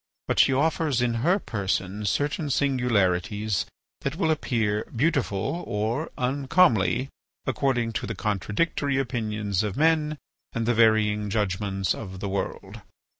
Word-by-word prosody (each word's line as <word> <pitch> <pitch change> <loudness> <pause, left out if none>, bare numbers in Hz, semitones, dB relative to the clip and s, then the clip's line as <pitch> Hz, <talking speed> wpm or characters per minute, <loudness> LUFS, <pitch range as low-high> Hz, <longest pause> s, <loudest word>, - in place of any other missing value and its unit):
But - - 0
she - - +6
offers 150 -1 +1
in 120 -1 +1
her 175 +8 +3
person 100 - -2
certain 145 - 0
singularities 110 - +1 0.3
that 140 +2 -3
will 160 -2 +1
appear 110 -8 0
beautiful 135 - -1
or 110 +9 -1
uncomely 130 - +2 0.4
according 120 -3 0
to 125 - -5
the 110 - -4
contradictory 110 - -1
opinions 105 -6 -1
of 105 -2 -3
men 155 0 +2 0.4
and 115 0 -1
the 120 - +2
varying 110 -2 +3
judgments 95 -2 0
of 95 -4 -7
the 100 - -3
world. 100 +2 -4
115 Hz, 125 wpm, -26 LUFS, 105-140 Hz, 0.4 s, she